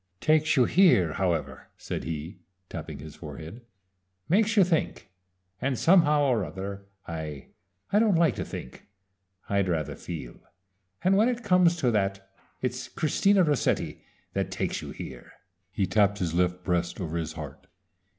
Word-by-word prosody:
"Takes 155 -1 +3
you 125 - +6
here, 135 - +4
however," 90 -4 -2
said - - -5
he, 80 +3 -5 0.3
tapping - - -6
his 75 0 -10
forehead. 80 - -9 0.7
"Makes 210 +4 +2
you 200 - +8
think 165 - -1 0.5
and 135 -1 0
somehow 150 -3 +5
or 125 -7 +2
other 100 +4 -6 0.2
I 80 -4 -6 0.4
I 205 - +6
don't 215 -4 +4
like 165 -5 +4
to - - -2
think. 65 - -9 0.6
I'd 100 -2 +1
rather 80 -4 -1
feel 80 -8 -7 0.6
and 190 +2 +4
when 220 +4 +4
it 240 -1 -3
comes 180 -4 +4
to 130 -8 +1
that 95 -2 -1 0.3
it's - - -2
Christina 195 +5 +2
Rossetti 150 -5 0 0.3
that - - -1
takes - - -2
you - - -7
here." 60 -2 -9 0.4
He 95 - 0
tapped 100 0 +2
his 85 -5 -2
left 90 +1 +1
breast 90 -1 -1
over 85 -3 -4
his 80 -2 -3
heart. - - -9
100 Hz, 150 wpm, -27 LUFS, -, 0.7 s, you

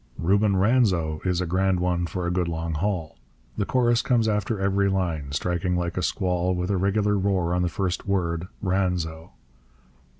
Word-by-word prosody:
Reuben 100 +4 +2
Ranzo 95 -7 +2
is 90 -1 0
a - - -1
grand 95 +2 +1
one 90 -1 0
for 90 0 -4
a 85 - 0
good 90 -1 0
long 80 0 -3
haul. 85 -2 -2 0.4
The 100 - -2
chorus 120 -2 +2
comes 120 -4 +2
after 105 0 0
every 100 0 +2
line, 85 -7 -1
striking 90 +4 -1
like 85 -1 -2
a 90 - -1
squall, 90 -1 0
with 90 +2 -2
a 100 - +1
regular 100 +2 +1
roar 95 -3 0
on 90 - +1
the 90 - +1
first 95 +1 -3
word, 85 -3 -1 0.2
Ranzo. 90 -4 -1
90 Hz, 175 wpm, -25 LUFS, 85-100 Hz, 0.4 s, Reuben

